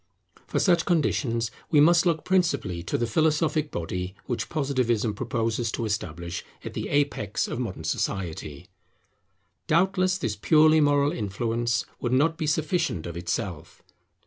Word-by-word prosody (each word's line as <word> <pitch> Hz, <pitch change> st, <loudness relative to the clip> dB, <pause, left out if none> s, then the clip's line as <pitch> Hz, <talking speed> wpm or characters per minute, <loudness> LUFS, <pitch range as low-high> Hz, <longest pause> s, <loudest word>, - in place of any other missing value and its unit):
For -, -, -2 dB
such 175 Hz, -3 st, +3 dB
conditions 120 Hz, -9 st, +1 dB, 0.2 s
we 150 Hz, -, +4 dB
must 170 Hz, +3 st, +5 dB
look 160 Hz, -2 st, 0 dB
principally 170 Hz, -, +1 dB
to -, -, -2 dB
the 120 Hz, -, 0 dB
philosophic 155 Hz, +4 st, +1 dB
body 90 Hz, -, -4 dB
which 120 Hz, -, -3 dB
Positivism 125 Hz, -8 st, 0 dB
proposes 115 Hz, +2 st, -1 dB
to 115 Hz, -, -2 dB
establish 85 Hz, -5 st, -4 dB, 0.2 s
at -, -, -5 dB
the -, -, -4 dB
apex 140 Hz, -8 st, 0 dB
of -, -, -4 dB
modern 95 Hz, -10 st, -4 dB
society. 80 Hz, -3 st, -3 dB, 1.0 s
Doubtless 185 Hz, +2 st, +2 dB
this 115 Hz, -, -2 dB
purely 155 Hz, +7 st, +5 dB
moral 145 Hz, 0 st, +3 dB
influence 115 Hz, -, -1 dB
would 120 Hz, 0 st, -1 dB
not 155 Hz, +5 st, +3 dB
be 155 Hz, -, -3 dB
sufficient 155 Hz, -, 0 dB
of 85 Hz, -1 st, -6 dB
itself. 85 Hz, 0 st, -4 dB
120 Hz, 140 wpm, -26 LUFS, 100-155 Hz, 1.0 s, must